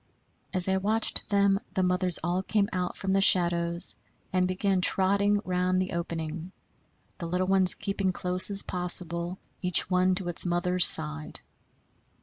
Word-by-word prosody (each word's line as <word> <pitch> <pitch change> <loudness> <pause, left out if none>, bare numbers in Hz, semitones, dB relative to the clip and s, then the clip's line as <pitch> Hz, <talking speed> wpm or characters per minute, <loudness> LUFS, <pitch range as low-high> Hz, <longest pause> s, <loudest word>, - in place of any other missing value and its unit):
As 185 -1 -2
I 190 0 0
watched 215 +4 +1
them 200 -1 +1 0.2
the 190 - 0
mothers 180 -1 0
all 175 +2 -2
came 200 +1 -1
out 180 -1 -4
from 190 - -4
the 195 0 +1
shadows 170 -2 +2 0.4
and 185 -1 0
began 185 0 -2
trotting 200 +2 +1
round 185 0 -1
the 185 0 -4
opening, 170 0 -6 0.7
the 170 - -6
little 180 +2 -2
ones 190 -1 +2
keeping 195 -1 -3
close 180 +1 +4
as 200 -1 +3
possible, 175 0 +2 0.2
each 180 0 +2
one 185 0 +1
to 185 -1 -2
its 175 - -2
mother's 180 0 +2
side. 75 0 +2
185 Hz, 150 wpm, -26 LUFS, 175-190 Hz, 0.7 s, close